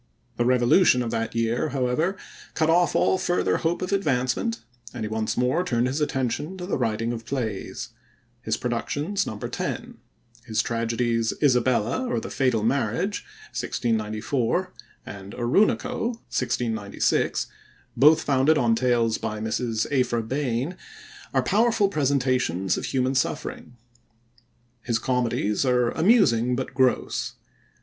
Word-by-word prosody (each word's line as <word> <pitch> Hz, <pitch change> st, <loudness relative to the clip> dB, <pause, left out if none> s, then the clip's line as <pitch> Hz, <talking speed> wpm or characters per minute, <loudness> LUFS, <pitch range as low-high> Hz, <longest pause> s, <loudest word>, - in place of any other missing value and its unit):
The 120 Hz, -, +1 dB
Revolution 125 Hz, +3 st, +4 dB
of 115 Hz, -, -3 dB
that 115 Hz, +1 st, -2 dB
year, 115 Hz, +1 st, 0 dB
however, 135 Hz, +8 st, 0 dB, 0.4 s
cut 160 Hz, 0 st, +2 dB
off 175 Hz, +1 st, +3 dB
all 190 Hz, -, +3 dB
further 175 Hz, -, +1 dB
hope 170 Hz, +2 st, -1 dB
of 185 Hz, -, -3 dB
advancement, 150 Hz, -, 0 dB, 0.3 s
and 120 Hz, -, -4 dB
he -, -, -2 dB
once 110 Hz, 0 st, -2 dB
more 125 Hz, +8 st, +2 dB
turned 120 Hz, -8 st, 0 dB
his 135 Hz, +4 st, -1 dB
attention 145 Hz, +5 st, -2 dB
to 180 Hz, -, -5 dB
the 190 Hz, -, -1 dB
writing 115 Hz, -1 st, -1 dB
of 115 Hz, -1 st, -6 dB
plays. 115 Hz, -5 st, -4 dB, 0.5 s
His 110 Hz, -1 st, -1 dB
productions 145 Hz, -, -2 dB
number 105 Hz, -, -5 dB
ten. -, -, -5 dB, 0.4 s
His 110 Hz, -2 st, 0 dB
tragedies 115 Hz, 0 st, 0 dB
Isabella, 125 Hz, -, +2 dB
or 240 Hz, -, 0 dB
the -, -, -7 dB
Fatal 125 Hz, -5 st, +1 dB
Marriage 130 Hz, -, 0 dB, 0.3 s
(1694) 115 Hz, -, -1 dB, 0.3 s
and 100 Hz, 0 st, -9 dB
Oroonoko 205 Hz, -, +1 dB, 0.2 s
(1696), 120 Hz, -5 st, 0 dB, 0.5 s
both 150 Hz, +3 st, +5 dB
founded 140 Hz, +3 st, +3 dB
on 120 Hz, -4 st, +3 dB
tales 115 Hz, -2 st, +1 dB
by 105 Hz, 0 st, -4 dB
Mrs. 110 Hz, +1 st, -1 dB
Aphra 125 Hz, -4 st, +1 dB
Behn, 135 Hz, +5 st, -2 dB, 0.5 s
are -, -, +1 dB
powerful 220 Hz, 0 st, +3 dB
presentations 130 Hz, -, +1 dB
of -, -, -4 dB
human 130 Hz, 0 st, 0 dB
suffering. 125 Hz, -1 st, -3 dB, 1.0 s
His 115 Hz, 0 st, 0 dB
comedies 120 Hz, -4 st, 0 dB
are 125 Hz, -2 st, +2 dB
amusing, 125 Hz, -, +3 dB
but 130 Hz, +1 st, -4 dB
gross. 130 Hz, -2 st, +1 dB
125 Hz, 130 wpm, -25 LUFS, 115-150 Hz, 1.0 s, both